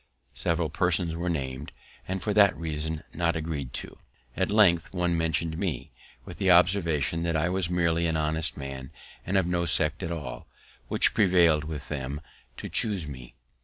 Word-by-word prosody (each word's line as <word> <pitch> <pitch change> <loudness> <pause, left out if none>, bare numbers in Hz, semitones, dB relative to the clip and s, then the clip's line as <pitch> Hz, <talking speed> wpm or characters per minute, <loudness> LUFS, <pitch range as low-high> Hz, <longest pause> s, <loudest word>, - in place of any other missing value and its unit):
Several 80 +5 -1
persons 85 0 +1
were 85 +1 -2
named, 70 -3 -3 0.4
and 95 0 -3
for 105 - 0
that 100 -2 +5
reason 80 -1 -3
not 85 -1 0
agreed 80 -5 -3
to. - - -6 0.4
At - - 0
length 95 -5 +4
one 90 -1 +1
mention'd 80 0 -1
me, 95 -5 -3 0.3
with - - -9
the 95 - +2
observation 85 -4 +3
that 85 -1 0
I 80 +3 +1
was 90 -2 0
merely 85 -1 +1
an 80 -1 0
honest 80 +1 -1
man, 70 -2 -6 0.4
and 95 +2 +2
of 95 - +3
no 90 0 0
sect 80 -1 +1
at 85 - -3
all, 75 -7 -6 0.4
which - - +2
prevailed 85 -6 +4
with 75 -2 -6
them 70 -1 -4 0.4
to - - -6
chuse 100 -8 0
me. 65 -4 -10
85 Hz, 170 wpm, -27 LUFS, 75-90 Hz, 0.4 s, that